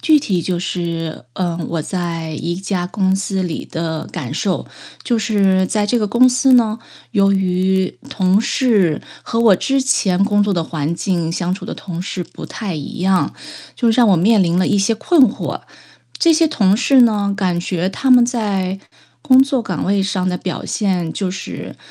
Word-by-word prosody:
具 310 -1 +4
体 195 - -1
就 180 -2 -2
是， 170 -5 -4
嗯， 175 -2 -2
我 165 -2 -2
在 165 -3 -4
一 170 +3 -3
家 185 -1 -3
公 190 0 0
司 195 -1 -2
里 170 -3 -4
的 160 -1 -4
感 - - -5
受。 - - -2 0.4
就 240 -2 +1
是 195 -4 +2
在 210 +1 0
这 240 +3 +1
个 210 - 0
公 245 +5 +4
司 255 +1 +3
呢， 230 -2 +3 0.3
由 195 -2 +3
于 190 -3 0
同 190 +2 +2
事 205 - +1 0.2
和 230 - -3
我 220 -5 +5
之 270 +7 0
前 195 -8 +1
工 205 -1 +2
作 205 - 0
的 170 -3 0
环 155 -1 -3
境 170 -2 -1
相 175 +1 -2
处 195 - -9
的 - - -5
同 175 -3 -7
事 180 -1 -4
不 - - -11
太 200 -7 -5
一 150 +3 -7
样， 185 0 +1 0.4
就 235 -2 +2
让 235 -1 +4
我 190 - +5
面 205 +4 +4
临 170 0 +1
了 185 - +2
一 205 - +2
些 200 +3 +2
困 310 +7 +3
惑。 - - -5 0.6
这 335 - +4
些 320 0 +3
同 200 -8 +2
事 255 +2 +4
呢， 205 -3 +2
感 180 -4 0
觉 180 +1 -2
他 265 +7 -2
们 250 -1 +7
在 195 -6 -2 0.4
工 260 -3 +5
作 270 -2 -1
岗 - - -3
位 195 0 +1
上 185 -1 -1
的 180 - -1
表 180 0 -5
现， 185 -6 -1
就 190 -3 -3
是 190 - -7
195 Hz, 205 characters per minute, -18 LUFS, 180-225 Hz, 0.6 s, 们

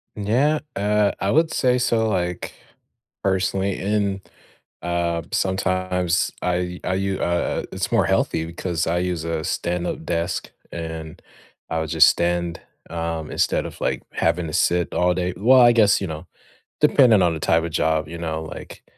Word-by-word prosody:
Yeah, 125 +9 +1 0.2
uh, 105 +1 +2
I 100 - 0
would 160 +1 +2
say 125 -1 +2
so, 115 -2 +1
like, 90 -3 -2 0.7
personally, 95 0 0
and, 100 -1 -1 0.6
uh, 85 -1 -1
sometimes 95 -2 0
I 90 0 -1
I 90 - -1
u 95 0 -1
I, - - +1
uh 85 0 -1
It's - - -3
more - - +3
healthy 80 0 0
because 85 0 -3
I 85 +1 +1
use 90 -2 -2
a 80 -1 -2
stand 90 +2 -2
up 80 - -5
desk 85 +1 -2 0.2
and 80 -1 -7 0.5
I 80 - -1
would 80 -1 -3
just 80 -1 +6
stand, 85 0 -1 0.3
um, 80 -2 -4
instead - - 0
of, - - -8
like, - - -1
having 85 +1 0
to 75 - -7
sit 90 +2 +1
all 90 0 +2
day 90 0 -1
well, 125 +5 +6
I 120 0 +7
guess, 105 -4 +4
you 95 - -2
know, 80 -1 -7 0.5
depending 125 -9 +5
on 85 -2 +2
the 80 - -5
type 80 +1 +2
of 85 - -4
job, 80 0 +1
you 85 - -7
know, 80 -1 -3
like 80 - -10
90 Hz, 170 wpm, -22 LUFS, 85-100 Hz, 0.7 s, I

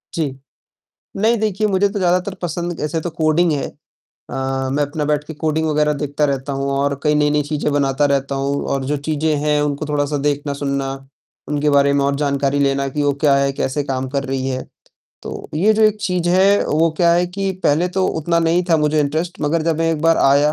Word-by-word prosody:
जी। 145 -5 -2 0.8
नहीं 225 +3 +2
देखिए, 215 0 0
मुझे 200 0 +2
तो 205 0 -4
ज़्यादातर 180 +2 +1
पसंद 175 0 -3
ऐसे 160 +2 -1
तो 175 - -3
कोडिंग 160 +2 +2
है। 145 - -1 0.6
अ, 135 0 -2
मैं 145 +1 +1
अपना 150 +1 -3
बैठ 150 0 0
के 160 - -8
कोडिंग 160 +1 -1
वगैरह 150 0 +2
देखता 145 0 -2
रहता 140 0 -1
हूँ 135 0 -2
और 140 0 0
कई 150 -1 +2
नई-नई 150 0 +2
चीज़ें 150 0 -2
बनाता 140 0 +1
रहता 140 0 -1
हूँ 140 +1 -1
और 135 -1 -2
जो 145 +2 -1
चीज़ें 155 0 +1
हैं 150 -1 +2
उनको 145 +1 -2
थोड़ा-सा 145 0 -1
देखना, 145 0 -1
सुनना, 140 -1 -2 0.6
उनके 150 0 +1
बारे 140 0 +4
में 140 -1 +2
और 140 0 +1
जानकारी 140 -1 0
लेना 140 0 +1
कि 145 +2 -2
वो 145 -1 +2
क्या 140 -2 +5
है, 140 0 +1
कैसे 135 +2 -2
काम 130 -1 -3
कर 140 0 -2
रही 135 -1 -2
है। 130 0 -4 0.6
तो - - -7
ये 200 +8 +3
जो 220 - +2
एक 215 -1 +4
चीज़ 180 -2 -1
है 195 +3 +4
वो 160 +2 +2
क्या 170 -1 +4
है 175 +1 +2
कि 195 +2 -3
पहले 160 +5 +2
तो 190 - +2
उतना 170 +2 0
नहीं 165 +2 +2
था 165 - +5
मुझे 150 0 +1
इंटरेस्ट 160 +5 -2
मगर 155 +2 0
जब 165 -1 0
मैं 165 0 +1
एक 150 - -3
बार 165 0 +4
आया, 145 +2 +4
150 Hz, 215 wpm, -19 LUFS, 140-165 Hz, 0.8 s, क्या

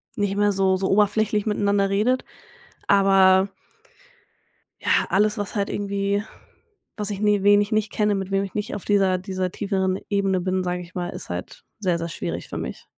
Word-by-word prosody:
nicht 205 -2 -1
mehr 205 0 +3
so 190 -1 +2
so 190 0 -1
oberflächlich 210 +1 +2
miteinander 200 -2 +1
redet. 230 +6 +1 0.6
Aber 195 -1 +5 1.3
ja, - - +2
alles 210 +2 +2
was 205 +1 -4
halt 200 -1 0
irgendwie 200 0 -1 0.7
was 210 -1 -2
ich 200 +1 -5
ni 205 -2 +2
wen 205 0 +6
ich 205 +2 -3
nicht 215 0 0
kenne, 210 -1 +1
mit 195 -1 -4
wem 195 0 +1
ich 195 - -7
nicht 210 - -3
auf 205 - -6
dieser 195 -3 +3
dieser 185 -1 -3
tieferen 190 -1 -1
Ebene 195 -2 +1
bin, 185 +1 -1
sage 180 0 -2
ich 175 +1 -13
mal, 175 -1 -3
ist - - -8
halt 90 +1 -6 0.2
sehr 180 -5 0
sehr 170 0 -4
schwierig - - -5
für - - -5
mich. - - -6
200 Hz, 185 wpm, -23 LUFS, 190-205 Hz, 1.3 s, wen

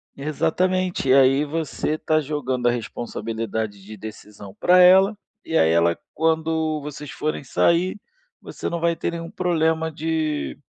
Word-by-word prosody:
Exatamente, 165 +1 0
aí 135 +2 +5
você 155 0 -2
tá 155 0 +1
jogando 130 -4 -2
a - - +4
responsabilidade 110 -3 -4
de 110 +2 -10
decisão 105 -1 -10
pra 180 +1 +5
ela, 190 +3 +6 0.3
e 165 - -4
aí 80 - +4
ela 85 +1 +3 0.2
quando 160 -1 0
vocês 145 -1 -8
forem 155 -1 -3
sair, 170 - +1 0.4
você - - -6
não 170 - -3
vai 170 0 +1
ter 165 - -3
nenhum 165 0 -6
problema 160 -2 0
de 155 - -2
155 Hz, 140 wpm, -22 LUFS, 120-165 Hz, 0.4 s, ela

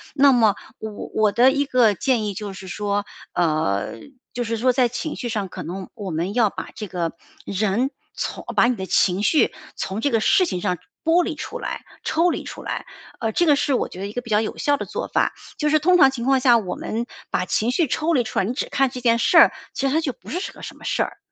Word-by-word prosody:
那 280 -1 +6
么 225 -5 +4 0.2
我 220 - -5 0.2
我 215 -1 +3
的 245 +6 +5
一 285 +1 +1
个 250 -6 +4
建 240 +2 +1
议 205 - -2
就 205 0 -6
是 190 0 -10
说， 205 +2 -2 0.3
呃， 155 - 0 0.3
就 245 - -2
是 230 0 -2
说 255 +3 +3
在 250 -1 +3
情 295 +6 -4
绪 240 - -4
上， 210 -4 -2
可 - - -8
能 185 +2 -6
我 200 -3 -6
们 170 +5 -2
要 225 -3 +3
把 185 -1 -7
这 210 - -6
个 175 -3 -2 0.3
人 215 +6 0 0.2
从 - - -4
把 - - +5
你 245 +1 +2
的 190 -3 -5
情 185 +2 +2
绪 305 +8 +3 0.2
从 195 +3 -3
这 285 - +2
个 225 - +2
事 375 - +4
情 180 - -2
上 180 -3 0 0.3
剥 335 +2 +4
离 330 -4 -3
出 305 - -6
来、 - - -4 0.2
抽 335 +2 +2
离 - - -2
出 - - -8
来， - - -4 0.3
呃， 225 -3 -1
这 345 - +2
个 295 -3 +5
是 280 -1 0
我 - - +1
觉 180 - -10
得 200 - -3
一 205 - -8
个 245 - -3
比 230 - -12
较 210 -1 +4
有 220 - -4
效 290 - +2
的 - - -4
做 - - -4
法， - - +1 0.2
就 300 - +1
是 310 +1 +4
通 360 +4 +4
常 270 -5 +7
情 240 -3 -5
况 270 0 +4
下， 245 -2 +6
我 195 -5 -3
们 230 +2 -3 0.2
把 180 - 0
情 220 +5 0
绪 315 +3 +2
抽 315 +6 0
离 255 -5 +3
出 220 - -2
来， - - +1
你 230 - -2
只 260 - -3
看 270 -1 +2
这 250 - -7
件 230 -1 +4
事 335 +8 +3
儿， - - +9 0.2
其 275 - 0
实 265 - 0
它 320 - +3
就 295 -5 -1
不 - - -15
是 360 +4 -3
个 - - -14
什 - - -8
么 - - -13
事 - - +1
儿 - - -7
235 Hz, 280 characters per minute, -22 LUFS, 200-275 Hz, 0.3 s, 儿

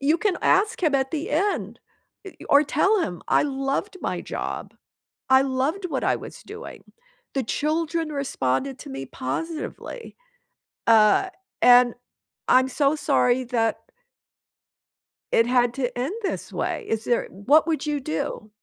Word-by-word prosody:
you 300 +4 +3
can 380 0 +1
ask 420 +2 +2
him 305 -4 +2
at 265 -1 +1
the 315 -2 -3
end, 385 +7 -1 0.5
i 385 - -10
or 285 - +6
tell 385 +8 +2
him, 180 - -3
"I - - +3
loved 275 +8 -2
my - - -2
job. - - -5 0.6
I 265 0 +7
loved 275 +8 -1
what - - -2
I - - +2
was - - -9
doing. 440 +3 -11 0.4
The 270 - +1
children 315 - -1
responded 270 - -2
to - - -10
me 135 0 -6
positively, 325 - -5 0.7
uh, 220 - +5 0.3
and 245 -1 +7 0.5
I'm 260 +1 +4
so 280 +2 +1
sorry 260 -4 +2
that" 230 -2 0 1.5
"it 230 - +4
had 245 -1 +2
to 255 -3 -2
end 265 +9 -2
this 390 - -3
way. - - -3
Is 225 0 -1
there" 240 - 0 0.2
What 305 +5 +5
would 320 -1 -1
you 295 -1 -1
do? 215 - -4
275 Hz, 145 wpm, -24 LUFS, 245-325 Hz, 1.5 s, I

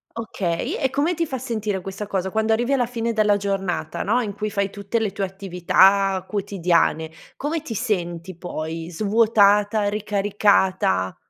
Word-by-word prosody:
Okay, 195 -7 -3
e 265 - 0
come 290 +6 0
ti 335 -1 -1
fa 265 - -3
sentire 215 -5 -3
questa 195 +3 -6
cosa, 190 -2 -2
quando 220 +1 0
arrivi 240 +4 +1
alla 250 -3 +2
fine 235 -1 -2
della 210 -2 +3
giornata, 195 -5 -2
no, 230 +5 +1
in 210 -4 -4
cui 215 +1 -3
fai 200 -1 -1
tutte 200 +2 -3
le 215 -3 -1
tue 200 +1 -4
attività 190 +1 +2
quotidiane, 175 -6 0 0.2
come 305 +3 -2
ti 245 -7 -6
senti 175 -3 -2
poi, 165 -1 -5
svuotata? 205 +1 +3
Ricaricata? 200 - +1
200 Hz, 155 wpm, -22 LUFS, 185-220 Hz, 0.2 s, della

